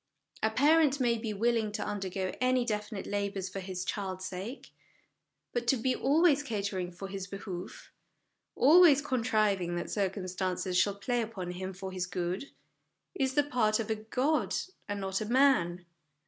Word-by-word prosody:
A 220 - +3
parent 290 +4 +4
may 235 -3 +2
be 220 -1 -3
willing 220 +1 +1
to - - -3
undergo 190 -2 -3
any 255 -1 +3
definite 210 -2 -3
labours 200 -2 -2
for 195 - -5
his 185 -1 -5
child's 190 -2 -3
sake; 190 +8 -6 0.8
but 240 -1 -2
to 265 - +4
be 255 +3 +1
always 295 +1 +4
catering 200 -8 -3
for 190 +2 -7
his 195 -1 -6
behoof, 195 - -7 0.6
always 310 +1 +7
contriving 215 -9 +1
that 175 - -4
circumstances 185 -2 -2
shall 200 +2 +3
play 240 +4 -1
upon 205 -6 -5
him 185 +1 -5
for 190 0 -7
his 185 -1 -3
good, 180 +7 -3 0.6
is 265 -6 -1
the 290 - +5
part 235 -6 +1
of 225 0 -2
a - - +2
god 255 +8 0 0.3
and 205 0 -2
not 190 +1 -2
of 215 - -4
a - - 0
man 185 -11 +3
210 Hz, 160 wpm, -30 LUFS, 190-250 Hz, 0.8 s, always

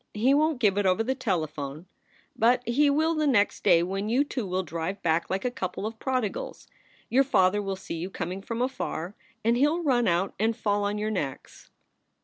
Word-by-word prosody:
He 245 +6 +3
won 310 +3 +3
t - - -10
give 205 -5 +2
it 200 - +2
over 185 +4 +2
the 260 +3 0
telephone, 155 - -3 0.5
but 245 +2 +2
he 285 +5 +3
will 315 +3 +2
the 310 -2 0
next 210 -7 +2
day 170 -1 +5
when 195 +4 -3
you 255 +5 +3
two 255 -7 -4
will 185 +1 -1
drive 170 +4 -4
back 165 0 +1
like 195 +5 -2
a 250 - +1
couple 190 -2 -4
of 220 0 -5
prodigals. 255 -6 -3 0.4
Your 265 +3 +4
father 205 -6 +3
will 195 -1 -3
see 185 -3 -6
you 175 +3 -4
coming 185 0 -5
from 230 +4 -3
afar, 195 -8 -3 0.3
and 230 +1 +4
he 270 +4 +4
ll 335 +3 -1
run 250 -5 +2
out 175 +3 +1
and 220 +1 +1
fall 205 -1 0
on 205 +1 -1
your 215 +1 -2
necks. 145 -10 -5
210 Hz, 210 wpm, -27 LUFS, 185-255 Hz, 0.5 s, day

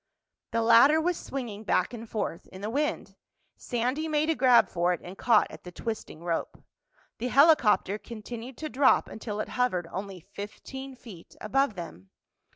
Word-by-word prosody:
The 230 0 0
ladder 235 +7 +7
was 350 +2 +1
swinging 235 -9 -6
back 220 - +1
and 230 -1 -8
forth 205 -6 -4
in 190 - -11
the 210 +2 -3
wind. 295 +4 -2 0.4
Sandy 250 +6 -2
made 310 +1 +1
a - - 0
grab 250 -3 +5
for 175 +1 +1
it 175 - -5
and 180 +2 -9
caught 225 +1 +4
at 155 - -11
the 180 - -9
twisting 215 -4 -6
rope. 170 -1 -3 0.6
The 245 - -2
helicopter 250 - +4
continued 235 +3 -8
to 315 - -4
drop 260 +2 +4
until 215 -1 -6
it - - -3
hovered 185 -9 0
only 195 -1 -6
fifteen 255 - -9
feet 210 -9 -13
above 270 +1 +1
them. 160 - -9
230 Hz, 165 wpm, -28 LUFS, 195-265 Hz, 0.6 s, ladder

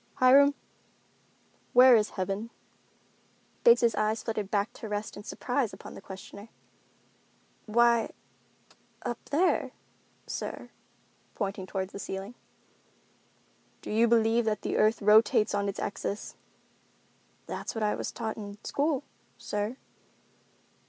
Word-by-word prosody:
"Hiram, 280 +3 +6 1.2
where 250 0 +8
is 215 -2 +2
heaven?" 195 +4 -2 1.1
Biggs' 260 - +6
eyes 215 +1 0
flitted 215 -3 -3
back 205 0 0
to 220 - -8
rest 210 +1 -4
in 205 - -9
surprize 245 +1 -2
upon - - -10
the - - -10
questioner. 200 +3 -10 1.2
"Why, 235 +1 +3 0.9
up 240 -2 -4
there, 345 +6 +1 0.5
sir," - - -6 0.6
pointing 195 -2 -3
toward 190 -1 -3
the - - -8
ceiling. 195 +3 -6 1.5
"Do - - -6
you 225 +2 +4
believe 230 0 +3
that 215 -1 -1
the - - -2
earth 215 0 +2
rotates 210 0 +5
on 200 0 0
its 200 - -5
axis?" 200 +1 -4 1.1
"That's - - -5
what 225 - -2
I 210 - +2
was - - -4
taught 220 -2 -4
in 205 -1 -8
school, 285 -1 0 0.3
sir." 210 +4 -3
220 Hz, 120 wpm, -29 LUFS, 205-235 Hz, 1.5 s, where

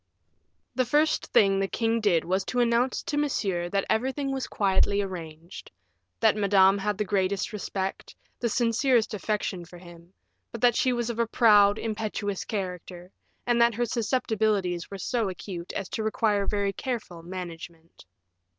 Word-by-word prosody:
The 255 - +1
first 300 +5 +2
thing 195 -1 +4
the 195 - 0
king 225 +2 0
did 180 -6 +2
was 190 +2 0
to 250 - -2
announce 240 +1 +1
to 290 - -3
Monsieur 195 -12 -1
that 195 +1 0
everything 265 +4 -1
was 265 -1 -3
quietly 200 0 +1
arranged; 170 -4 -7 0.5
that - - +4
Madame 200 -1 +4
had 205 0 -1
the 210 - -1
greatest 195 +1 -1
respect, 195 -2 -4 0.2
the 235 - 0
sincerest 235 0 +2
affection 205 -3 -2
for 175 +1 -13
him; 175 0 -14 0.4
but 235 - -6
that 245 -2 +4
she 255 - +2
was 240 -1 -1
of 235 - -7
a 235 - +2
proud, 205 -3 +5
impetuous 215 -3 -3
character, 180 -3 -5 0.3
and 240 -1 +2
that 235 -1 +4
her 240 +2 0
susceptibilities 215 -6 0
were 195 - -6
so 225 +2 -1
acute 180 -1 -7
as 195 - -4
to 225 - -3
require 215 -2 +1
very 200 -1 0
careful 215 -10 -5
management. 170 - -9
205 Hz, 160 wpm, -27 LUFS, 185-235 Hz, 0.5 s, proud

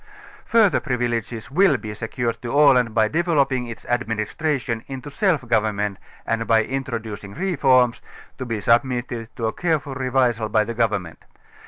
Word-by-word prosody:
Further 210 - +4
privileges 120 -3 -3
will 175 -2 +4
be 105 -1 -7
secured 115 +2 -3
to 120 - -5
Aland 130 -6 +4
by 110 -1 +4
developing 140 -5 +1
its 115 -1 -9
tadministration 120 +2 -2
into 135 +1 -7
self 155 - 0
government 105 -3 0 0.3
and 115 0 -1
by 110 -1 +4
introducing 110 -6 -5
reforms, 130 -9 +2 0.4
to 130 - -3
be 115 -2 -2
submitted 120 0 0
to 115 -5 -3
a 110 - -1
careful 155 -5 -1
r├®visai 125 -4 0
by 110 - +4
17 - - -1
the 115 - -4
government. 105 -7 -2
120 Hz, 150 wpm, -22 LUFS, 110-135 Hz, 0.4 s, Further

